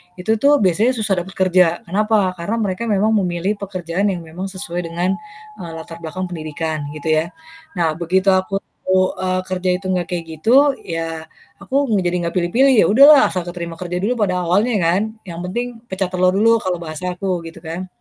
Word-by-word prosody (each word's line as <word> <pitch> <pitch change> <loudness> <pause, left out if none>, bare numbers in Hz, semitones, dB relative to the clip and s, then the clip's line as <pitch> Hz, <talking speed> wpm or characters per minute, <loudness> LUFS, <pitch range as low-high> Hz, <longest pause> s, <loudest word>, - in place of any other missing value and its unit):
itu 185 +4 -2
tuh 285 +1 +5
biasanya 215 +8 +3
susah 205 -5 0
dapat 185 +2 -8
kerja, 180 -2 +3
kenapa, 205 +1 +1
karena 205 +7 -2
mereka 205 +4 -2
memang 210 +1 +2
memilih 185 +3 -1
pekerjaan 185 0 -2
yang 180 -4 -2
memang 175 +4 -6
sesuai 180 -2 -4
dengan 180 +4 -1 0.4
latar 165 -1 -8
belakang, 175 +3 -5
pendidikan 155 -2 -4
gitu 155 +1 -2
yah. 155 +2 +2 0.5
Nah, 165 -2 +2
begitu 185 +3 0
aku, 190 +1 +1 0.4
eee, 185 0 +1
kerja 185 0 -2
itu 195 - -16
enggak 180 -2 -1
kayak 170 -2 -3
gitu, 255 - +3
ya, 165 -1 -4 0.4
aku 275 +7 0
eng 205 -5 +1
jadi 175 0 0
enggak 170 +1 -3
pilih-pilih, 240 +10 +3
ya - - +3
udahlah 280 +4 +7
asal 180 -2 -3
keterima 170 -1 -6
kerja 180 -1 -4
dulu 235 +2 0
pada 180 -3 +1
awalnya 205 +7 +2
kan, 175 +4 +2 0.2
yang 170 -3 -8
penting 240 +4 -4
pecah 190 -2 -2
telur 185 0 +2
dulu 230 +2 +4
kalau 185 -3 -1
bahasa 170 +3 -4
aku, 185 -1 -2
gitu 165 +1 -12
kan. 170 +3 -5
185 Hz, 185 wpm, -19 LUFS, 170-200 Hz, 0.5 s, udahlah